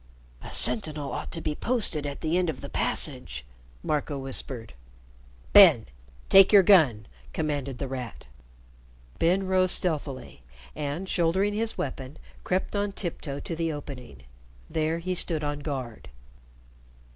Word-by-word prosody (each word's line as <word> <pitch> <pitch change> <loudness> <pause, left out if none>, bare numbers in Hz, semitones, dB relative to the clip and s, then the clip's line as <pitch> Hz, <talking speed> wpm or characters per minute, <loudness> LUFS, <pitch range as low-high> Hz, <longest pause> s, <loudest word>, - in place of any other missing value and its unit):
"A - - -9
sentinel 145 +4 +2
ought - - -5
to 165 - -6
be 155 - -2
posted 180 - -1
at 140 - -7
the 160 +2 -1
end 180 -2 +1
of 145 - -5
the 140 - -8
passage," 130 - -1 0.4
Marco 150 -1 -2
whispered. 130 - -4 0.8
"Ben, - - +8 0.4
take 195 0 +7
your 200 -2 +7
gun!" 150 - +4 0.3
commanded 140 -4 -3
The 135 - -4
Rat. 125 -3 -7 0.9
Ben 185 +4 +2
rose 185 0 +2
stealthily, 145 - -2 0.3
and, 150 +5 -4
shouldering 185 +4 +1
his 225 +1 -2
weapon, 135 +1 -5 0.3
crept 185 +3 -2
on 205 0 -1
tiptoe 155 -7 -4
to 165 - -5
the 165 0 -1
opening. 125 - -9 0.5
There 160 +1 0
he 180 +2 -3
stood 165 -3 +1
on 145 0 -3
guard. 130 -6 -6
155 Hz, 135 wpm, -26 LUFS, 135-180 Hz, 0.9 s, Ben